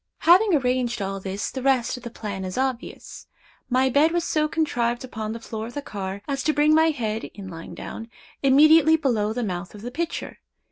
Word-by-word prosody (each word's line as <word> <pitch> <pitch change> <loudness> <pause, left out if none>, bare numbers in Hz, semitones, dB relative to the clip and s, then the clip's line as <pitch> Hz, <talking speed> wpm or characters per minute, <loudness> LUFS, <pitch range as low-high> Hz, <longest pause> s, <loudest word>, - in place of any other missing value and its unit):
Having 365 +3 +6
arranged 250 -3 0
all 195 0 -3
this, 195 +1 -4
the 260 - -5
rest 260 -3 +2
of 250 - -9
the 240 - -7
plan 205 -4 -6
is 185 +3 -5
obvious. 260 -2 -4 0.4
My 260 +1 +3
bed 285 +5 +3
was 345 -1 +1
so 305 -2 +1
contrived 245 -7 -1
upon 220 -4 -5
the 230 - -5
floor 225 -1 -6
of 240 - -11
the 290 - -3
car, 195 -2 -6
as 275 -2 -2
to 310 - +3
bring 300 +1 +4
my 320 +1 +5
head, 225 -7 -2
in 200 -2 -8
lying 165 -2 -9
down, 225 +1 -8 0.3
immediately 310 +3 +6
below 235 -9 0
the 245 +2 -2
mouth 180 -1 -4
of 210 - -11
the 245 - -5
pitcher. 330 +5 -4
245 Hz, 205 wpm, -24 LUFS, 215-295 Hz, 0.4 s, Having